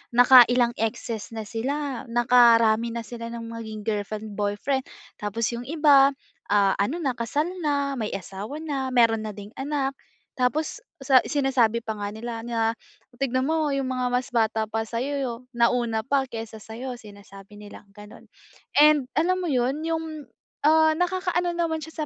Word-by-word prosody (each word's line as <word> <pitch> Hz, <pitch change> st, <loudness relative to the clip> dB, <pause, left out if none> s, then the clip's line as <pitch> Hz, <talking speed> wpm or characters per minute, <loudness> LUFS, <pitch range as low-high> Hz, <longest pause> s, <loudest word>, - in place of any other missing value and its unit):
nakailang 245 Hz, -1 st, +7 dB
exes 225 Hz, 0 st, -3 dB
na 220 Hz, -, -4 dB
sila, 265 Hz, +3 st, -3 dB
nakarami 235 Hz, -1 st, +4 dB
na 235 Hz, -, -3 dB
sila 230 Hz, +1 st, -7 dB
ng 235 Hz, 0 st, -6 dB
maging 220 Hz, -2 st, -7 dB
girlfriend, 215 Hz, 0 st, -3 dB
boyfriend. 210 Hz, +6 st, -1 dB, 0.4 s
Tapos 210 Hz, +2 st, -2 dB
yung 235 Hz, -, -5 dB
iba, 290 Hz, -4 st, +5 dB, 0.4 s
ah, 200 Hz, -1 st, +4 dB
ano 210 Hz, +12 st, 0 dB
na 265 Hz, -, 0 dB
kasal 260 Hz, +7 st, -1 dB, 0.2 s
na, 285 Hz, -2 st, 0 dB
may 215 Hz, -1 st, -2 dB
asawa 200 Hz, +8 st, -7 dB
na, 275 Hz, -4 st, -2 dB
meron 225 Hz, -2 st, +4 dB
na -, -, -4 dB
ding 205 Hz, +1 st, -10 dB
anak. 275 Hz, -1 st, -1 dB, 0.5 s
Tapos 290 Hz, -, 0 dB, 0.2 s
sa 265 Hz, -1 st, +5 dB
sinasabi 255 Hz, -5 st, +1 dB
pa 220 Hz, -2 st, -5 dB
nga 205 Hz, 0 st, -4 dB
nila 230 Hz, +1 st, -6 dB
na, 230 Hz, -1 st, -1 dB, 0.4 s
"Tignan 255 Hz, -1 st, 0 dB
mo 305 Hz, +1 st, 0 dB
yung 270 Hz, -1 st, -1 dB
mga 255 Hz, -1 st, -1 dB
mas 250 Hz, +1 st, 0 dB
bata 220 Hz, -3 st, 0 dB
pa 225 Hz, 0 st, -2 dB
sa'yo 255 Hz, +6 st, -3 dB
yo 260 Hz, -4 st, -2 dB, 0.2 s
nauna 235 Hz, -2 st, +1 dB
pa 270 Hz, 0 st, 0 dB
kaysa 225 Hz, -2 st, -7 dB
sa'yo," 245 Hz, +4 st, -7 dB
sinasabi 200 Hz, -2 st, -13 dB
nilang 205 Hz, -1 st, -13 dB
ganun. 210 Hz, +1 st, -14 dB, 0.5 s
And, 295 Hz, -3 st, +5 dB
alam 365 Hz, +4 st, +2 dB
mo 350 Hz, -, -2 dB
yun, 265 Hz, +2 st, 0 dB
yung, 320 Hz, -4 st, -4 dB, 0.3 s
ah, 315 Hz, +1 st, +5 dB
nakakaano 355 Hz, 0 st, -1 dB
naman 325 Hz, -2 st, -1 dB
siya 315 Hz, 0 st, -5 dB
245 Hz, 160 wpm, -25 LUFS, 220-285 Hz, 0.5 s, nakailang